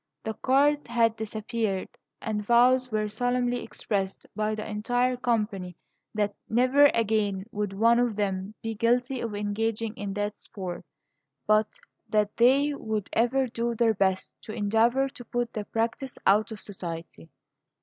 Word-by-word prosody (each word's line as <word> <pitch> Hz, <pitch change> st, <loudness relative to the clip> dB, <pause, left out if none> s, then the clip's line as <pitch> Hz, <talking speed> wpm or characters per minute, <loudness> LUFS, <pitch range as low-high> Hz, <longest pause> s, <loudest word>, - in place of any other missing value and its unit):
The 220 Hz, -, -3 dB
cards 285 Hz, +5 st, +2 dB
had 230 Hz, -1 st, +2 dB
disappeared, 220 Hz, -2 st, -2 dB, 0.4 s
and 210 Hz, -1 st, -2 dB
vows 250 Hz, +3 st, +4 dB
were 215 Hz, -1 st, 0 dB
solemnly 245 Hz, +3 st, 0 dB
expressed 195 Hz, -2 st, -3 dB
by 215 Hz, 0 st, 0 dB
the 215 Hz, -, -5 dB
entire 245 Hz, +4 st, 0 dB
company 210 Hz, -7 st, -1 dB, 0.4 s
that 205 Hz, -1 st, 0 dB, 0.2 s
never 255 Hz, +5 st, +5 dB
again 210 Hz, -5 st, 0 dB
would 210 Hz, -1 st, -2 dB
one 230 Hz, +4 st, +4 dB
of 240 Hz, -3 st, +1 dB
them 200 Hz, 0 st, -2 dB
be 225 Hz, 0 st, -2 dB
guilty 245 Hz, +3 st, +1 dB
of 225 Hz, -3 st, -3 dB
engaging 215 Hz, +2 st, -1 dB
in 200 Hz, -2 st, -5 dB
that 205 Hz, +1 st, -2 dB
sport, 185 Hz, -4 st, -7 dB, 0.6 s
but 215 Hz, 0 st, +4 dB, 0.4 s
that 210 Hz, -1 st, +1 dB
they 275 Hz, +5 st, +4 dB
would 220 Hz, -7 st, -3 dB
ever 250 Hz, +4 st, +2 dB
do 235 Hz, -1 st, -2 dB
their 230 Hz, 0 st, +3 dB
best 190 Hz, -2 st, 0 dB
to 215 Hz, -, -8 dB
endeavor 230 Hz, +5 st, +2 dB
to 265 Hz, -2 st, -11 dB
put 240 Hz, 0 st, -2 dB
the 215 Hz, -2 st, -4 dB
practise 230 Hz, +5 st, -2 dB
out 210 Hz, +3 st, +4 dB
of 220 Hz, -, -7 dB
society. 170 Hz, -4 st, -7 dB
220 Hz, 150 wpm, -27 LUFS, 205-245 Hz, 0.6 s, never